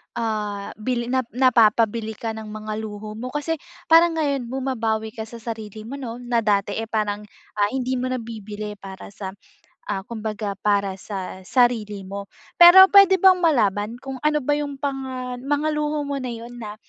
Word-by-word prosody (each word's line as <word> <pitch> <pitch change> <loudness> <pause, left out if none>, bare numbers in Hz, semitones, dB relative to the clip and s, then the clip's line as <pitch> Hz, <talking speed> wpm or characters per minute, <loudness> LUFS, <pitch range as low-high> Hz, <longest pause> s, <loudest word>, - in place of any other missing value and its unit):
ah, 210 -3 -3
bili 240 +1 -2
na 260 - +2 0.2
napapabili 225 -3 +3
ka 225 -1 -4
ng 220 0 -7
mga 215 0 -5
luho 215 -1 -6
mo. 250 - -4
Kasi 300 +1 -1 0.3
parang 330 0 +6
ngayon 280 -5 -1
bumabawi 230 -4 -2
ka 220 0 -7
sa 230 0 -11
sarili 220 -2 -6
mo 265 +6 -7
'no 235 -3 -5
na 240 -1 +1
dati, 205 -2 +1
eh, 225 - -4
parang, 210 -2 -1 0.4
ah, 205 - +4
hindi 255 +2 -2
mo 255 - -1
nabibili 215 -4 -6
para 195 0 -10
sa, 195 -1 -7 0.5
ah, 195 -2 -2
kumbaga 215 -2 -4
para 200 -2 0
sa 190 -1 -6
sarili 225 -5 +1
mo. 200 +1 -7 0.3
Pero 380 +2 +10
puwede 395 -1 +8
bang 375 0 +5
malaman 220 - +2
kung 270 -1 -6
ano 300 0 +1
ba 290 - 0
yung 290 -1 -1
panga 265 -3 -4
mga 290 +3 -1
luho 300 0 -1
mo 280 -1 -3
na 255 - -4
'yun 235 +1 -8
na, 210 -2 -7
230 Hz, 175 wpm, -23 LUFS, 210-270 Hz, 0.5 s, Pero